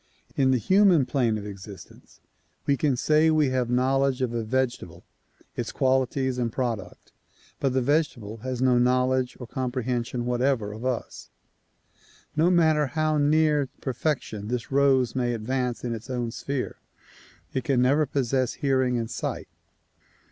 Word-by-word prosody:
In 135 -1 +3
the 130 - +4
human 185 - +4
plane 120 -5 +1
of 105 - -7
existence 100 -2 -11 0.4
we 140 - +3
can 140 -2 0
say 155 +4 +3
we 155 -3 +3
have 125 -2 0
knowledge 130 +1 +1
of 120 -2 -1
a 115 -1 -1
vegetable, 130 +2 -2 0.5
its - - -3
qualities 130 0 0
and 120 -2 -1
product, 115 -8 -4 0.5
but 135 -2 0
the 130 -1 +1
vege 150 +4 +2
table 110 -2 -9
has 130 +2 -3
no 125 -2 +4
knowledge 125 +1 +1
or 125 - -6
comprehension 125 -1 -3
whatever 125 -3 0
of 110 +4 -8
us. 130 -2 -4 1.1
No 160 +3 +3
matter 160 -4 +3
how 155 +1 0
near 150 -1 +2
perfection 130 -6 -3
this 120 +2 -4
rose 135 -3 +3
may 120 -2 0
advance 125 +2 -2
in 120 -1 -2
its 115 +3 -8
own 120 -2 -2
sphere 135 +2 -4 0.8
it 130 - -1
can 135 -1 +1
never 140 +4 +3
possess 130 -2 0
hearing 130 -3 +1
and 115 -1 -2
sight. - - -4
130 Hz, 150 wpm, -26 LUFS, 120-140 Hz, 1.1 s, the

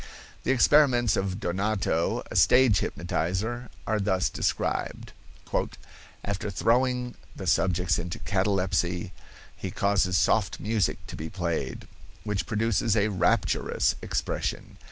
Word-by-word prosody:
The - - -4
experiments 125 -4 +4
of 95 0 -2
Donato, 95 -3 0
a - - -6
stage 125 -5 +5
hypnotizer, 110 +8 -2 0.2
are 110 -1 0
thus 95 -2 +1
described: - - -2 1.1
"After 100 0 -3
throwing 125 +4 +1 0.2
the 95 - -7
subjects 90 -1 +2
into 85 0 -4
catalepsy 90 -3 0 0.4
he - - -5
causes 95 -2 +1
soft 110 -3 +2
music 105 -2 0
to - - -8
be 80 +1 -6
played, 85 -3 -3 0.4
which 105 -2 -2
produces 110 0 +1
a 105 +1 +2
rapturous 90 - +1
expression. - - -3
100 Hz, 115 wpm, -27 LUFS, 90-115 Hz, 1.1 s, stage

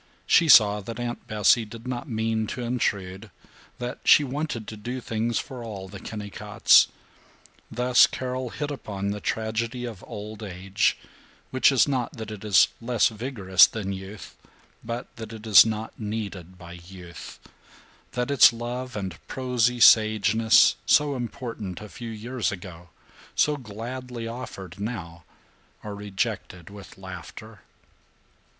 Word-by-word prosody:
She 170 -3 +4
saw 105 -5 +7
that 115 +4 -7
Aunt 120 0 -5
Bessie 110 +2 +3
did 115 +2 -10
not 125 -1 -5
mean 110 -1 -1
to 125 - -5
intrude; 105 -4 -2 0.5
that 125 0 -5
she 150 - +6
wanted 135 -4 -4
to 110 - -7
do 120 +5 -5
things 115 -1 -2
for 130 -3 -5
all 100 -4 -7
the 100 +1 -10
Kennicotts. 105 -1 +3 0.8
Thus 125 +1 +4
Carol 130 0 -4
hit 145 +4 -4
upon 100 -7 -4
the 105 0 -5
tragedy 115 +2 -2
of 115 -6 -8
old 105 +1 -8
age, 95 0 -1 0.5
which 130 +1 +4
is 135 -1 +4
not 130 0 -1
that 110 -4 -7
it 105 -1 -8
is 100 -5 +5
less 115 -1 +2
vigorous 105 -5 +4
than 100 -3 -4
youth, 95 +1 -9 0.5
but 120 +2 -4
that 110 -1 -8
it 110 0 -10
is 110 0 +8
not 110 0 -5
needed 100 -5 -5
by 85 -1 -12
youth; 90 -2 -11 0.8
that 125 +2 -2
its 140 - +8
love 120 +2 -5
and 95 -4 -5
prosy 125 -2 0
sageness, 110 0 +5
so 145 -1 +4
important 115 -6 -6
a 105 - -9
few 115 +2 -8
years 115 +2 -3
ago, 90 -3 -9 0.5
so 150 - +3
gladly 120 0 -7
offered 105 -6 -8
now, 90 -7 -6 0.6
are 105 - -6
rejected 95 -3 -4
with 100 -1 -12
laughter. 95 +3 -10
110 Hz, 140 wpm, -25 LUFS, 100-120 Hz, 0.8 s, is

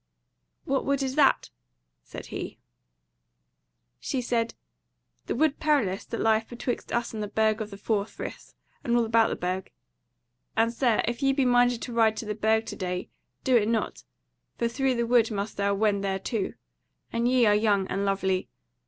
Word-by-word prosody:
"What 270 0 0
wood 280 0 0
is 260 -1 -2
that?" 280 -1 +3 0.5
said - - -9
he. - - -5 1.4
She 265 - -2
said: 235 -2 -1 0.7
"The - - -1
Wood 300 +2 +2
Perilous, 275 -12 +1
that 230 - -5
lieth 220 0 +2
betwixt 240 0 -4
us 235 -1 -1
and 215 - -4
the 210 - -2
Burg 220 +1 +1
of 215 - -4
the 200 - -9
Four 205 0 0
Friths, - - -8 0.3
and 240 0 +2
all 235 - +3
about 225 0 +4
the - - -2
Burg. 185 +1 -3 0.9
And, 230 +1 +3
Sir, 235 -2 +2
if 235 +3 -2
ye 270 0 +3
be 270 -1 +2
minded 245 -1 +3
to 240 - -5
ride 220 -2 +3
to 225 - -4
the 210 - -2
Burg 220 +1 +1
to - - -6
day, 180 -2 -3 0.3
do 260 - +3
it 215 -3 +4
not, 225 -1 -1 0.5
for 235 - +1
through 260 +2 0
the 235 0 0
wood 235 -1 +4
must 205 -1 -4
thou 200 0 +1
wend 205 -1 +1
thereto; 195 +2 -2 0.6
and 230 +1 +1
ye 250 -1 +4
are 210 - +5
young 205 -2 +2
and 195 +1 -2
lovely. 190 -1 0
225 Hz, 180 wpm, -27 LUFS, 205-245 Hz, 1.4 s, are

